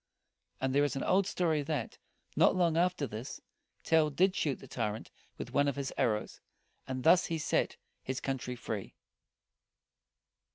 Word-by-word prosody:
And 130 +1 0
there 145 +1 +4
is 145 -3 0
an 135 - -2
old 195 0 +3
story, 165 -6 +1
that, 145 -5 -3 0.4
not - - +5
long 170 -3 +2
after 175 -3 +2
this, 115 0 -6 0.4
Tell 160 -2 +4
did 185 +6 +2
shoot 145 -6 0
the - - -13
tyrant 110 -2 -3 0.3
with - - -7
one 145 0 +3
of 140 - 0
his 140 -2 -3
arrows; 105 -3 -1 0.5
and 130 -1 -4
thus 175 +2 +5
he 165 - -1
set 155 - 0 0.2
his 130 0 -3
country 130 -2 -3
free. 110 -4 -5
140 Hz, 160 wpm, -32 LUFS, 130-165 Hz, 0.5 s, not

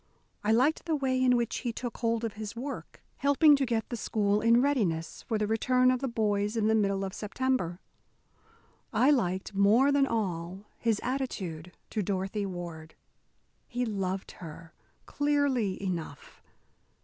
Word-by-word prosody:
I 210 - +2
liked 260 +8 +2
the 325 -2 +1
way 260 -2 +1
in 250 -1 +4
which 235 -1 -1
he 240 - -2
took 240 +1 -5
hold 230 -1 0
of 225 -3 -2
his 215 0 -6
work, 265 +5 -7
helping 285 +2 +5
to 275 -2 0
get 230 -2 -1
the 240 - -3
school 210 -2 0
in 230 +1 +5
readiness 205 - 0
for 225 - -2
the 210 - 0
return 255 +4 +3
of 255 - 0
the 270 - -2
boys 210 -2 0
in 215 - +1
the 220 - +3
middle 200 -2 +1
of 190 - -6
September. 210 -5 -1 1.1
I 245 +6 +4
liked, 190 -7 0
more 215 +8 +4
than 280 -1 +3
all, 190 -4 -3
his 225 -3 +1
attitude 190 - -4
to 215 - -1
Dorothy 195 +1 -2
Ward. 170 -3 -7 0.7
He 245 0 -2
loved 195 -3 -3
her, 165 -1 -11 0.3
clearly 285 -9 +1
enough. 170 -7 -5
220 Hz, 160 wpm, -29 LUFS, 195-255 Hz, 1.1 s, helping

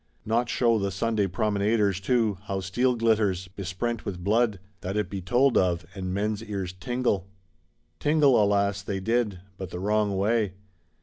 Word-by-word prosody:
Not 115 +2 +1
show 115 -2 +2
the 100 0 0
Sunday 105 +1 0
promenaders 100 0 +1
too, 110 -2 +1
how 100 -1 -2
steel 120 +7 +1
glitters, 105 -5 +1
besprent 100 +5 -3
with 90 -4 -5
blood; 110 0 +2 0.2
that 95 +3 -3
it 105 -4 -1
be 100 -2 -4
told 120 +8 +3
of, 90 -2 0
and 95 -2 -4
men's 105 +2 -1
ears 100 -4 -4
tingle?—Tingle, 95 - 0
alas, 100 -1 +1
they 100 -1 -3
did; 105 -2 0 0.2
but 95 -3 -6
the - - -6
wrong 105 0 +1
way. 105 0 +1
100 Hz, 150 wpm, -26 LUFS, 95-115 Hz, 0.2 s, told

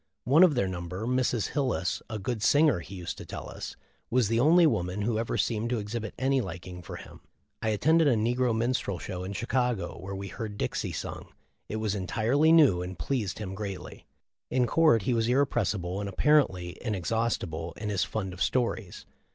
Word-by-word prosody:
One 140 +7 +5
of 180 -6 +6
their 100 -6 +1
number, 90 +3 -5
Mrs. 125 -2 +1
Hil 140 -2 0
lis, 95 -7 -1
a 110 - -3
good 110 +2 -3
singer, 145 - +4
he 95 +3 -9
used 90 -2 -6
to - - -7
tell - - -6
us - - -7 0.3
was 120 -4 +2
the 115 0 +2
only 165 +6 +6
man 90 - 0
who 110 0 0
ever 115 - -2
seemed 115 0 0
to 125 - 0
exhibit 110 +1 -4
any 135 +1 +2
liking 90 -2 -7
for 85 - -8
him. - - -11 0.4
I 110 - 0
attended 155 +10 +3
a 130 - +4
negro 120 +1 +1
minstrel 115 -5 0
show 90 +2 -5
in 95 +2 -5
Chicago, 120 -4 -1
where 95 +1 -6
we 100 0 -6
heard 105 -3 -6
Dixie - - -2
sung. - - -6 0.4
It - - -3
was 110 -2 -1
entirely 115 - +2
new, 145 - +6
and 90 0 -6
pleased 105 - -2
him 95 -3 -5
greatly. 100 -1 -7 0.4
In 125 -1 +2
court 155 -5 +4
he 125 - +1
was 115 -1 +1
irrepres 125 -5 +2
sible 90 +1 -4
and 100 -1 -3
apparently 95 -9 +2
inexhaustible 95 -6 -2
in 105 0 -4
his 100 -3 +1
fund 95 -4 -3
of 90 - -10
stories. 110 0 -1
110 Hz, 195 wpm, -28 LUFS, 95-125 Hz, 0.4 s, of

